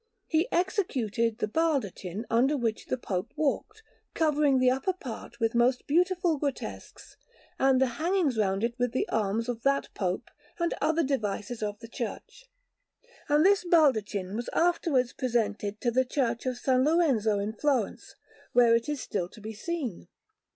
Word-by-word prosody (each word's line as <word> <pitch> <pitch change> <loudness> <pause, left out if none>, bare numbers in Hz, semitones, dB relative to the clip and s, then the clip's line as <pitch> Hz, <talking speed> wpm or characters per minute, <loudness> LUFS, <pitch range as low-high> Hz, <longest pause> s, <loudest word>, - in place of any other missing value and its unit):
He 330 +8 0
executed 250 - 0
the 225 - -1
baldachin 215 - -1
under 260 +6 +2
which 230 -4 -2
the 255 - -1
Pope 190 -4 -3
walked, 315 +9 -2 0.3
covering 300 -4 +3
the 255 0 +4
upper 270 +9 0
part 255 -9 -9
with 225 -1 +1
most 245 +1 +2
beautiful 350 0 +2
grotesques, 280 -2 -6 0.4
and 265 -1 +4
the 265 - +4 0.2
hangings 340 -6 +1
round 195 -1 0
it 235 0 0
with 245 -1 0
the 255 - 0
arms 220 +2 0
of 240 -2 -3
that 275 +2 +1
Pope 185 -2 -3 0.3
and 340 -1 0
other 320 +1 +2
devices 225 -4 -2
of 210 -1 -3
the 230 - -9
Church; 265 - -7 0.8
and 295 +3 +4
this 395 -1 +4
baldachin 215 - +2
was 235 +2 -3
afterwards 325 -8 +2
presented 210 -4 -1
to 240 - +1
the 260 +2 +3
Church 250 -2 -1
of 255 - 0
S. 245 - -14
Lorenzo 260 -5 +3
in 205 +2 -2
Florence, 255 -2 -1 0.4
where 240 -2 +6
it 230 +5 -1
is 295 -2 -2
still 180 -3 -3
to 215 - -14
be 215 +1 -7
seen. 245 - -4
250 Hz, 160 wpm, -28 LUFS, 220-300 Hz, 0.8 s, where